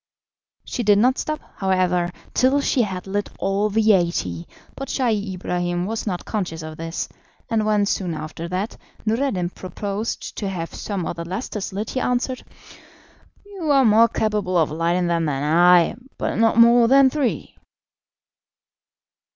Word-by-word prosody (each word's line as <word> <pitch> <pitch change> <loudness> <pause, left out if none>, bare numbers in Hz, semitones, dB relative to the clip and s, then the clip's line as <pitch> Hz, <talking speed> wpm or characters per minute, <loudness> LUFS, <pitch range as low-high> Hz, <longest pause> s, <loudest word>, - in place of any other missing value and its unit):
She - - -3
did 205 -3 +4
not 255 +5 +3
stop, 305 -1 -2 0.2
however, 185 -2 +1 0.2
till 260 +3 +3
she 275 -2 +1
had 185 -5 -3
lit 200 +1 -2
all 195 +2 0
the 220 +1 +3
eighty, 130 - -1 0.3
but 275 - -6
Scheih 215 -7 0
Ibrahim 175 0 -2
was 220 +2 -4
not 180 -3 -3
conscious 180 -7 -3
of 155 0 -7
this, 165 +1 -4 0.4
and 220 -1 +1
when, 210 -1 +3
soon 180 -4 -1
after 155 +2 -6
that, 185 +5 -3 0.3
Noureddin 215 -6 0
proposed 200 +5 -5
to 200 - -2
have 165 -3 -5
some 195 -5 -4
of 170 - -4
the 170 - -4
lustres 195 +3 -4
lit, 205 +3 -4
he 260 - -1
answered: 250 +1 -1 1.0
"You 390 -6 -5
are 275 -2 +5
more 225 +1 +6
capable 210 -5 -1
of 160 -3 +2
lighting 170 +3 0
them 170 -1 +1
than 140 -2 -1
I, 175 +3 +5 0.2
but - - -2
not 225 0 +3
more 235 0 +7
than 270 +1 +6
three." 285 -4 -2
200 Hz, 155 wpm, -22 LUFS, 175-230 Hz, 1.0 s, more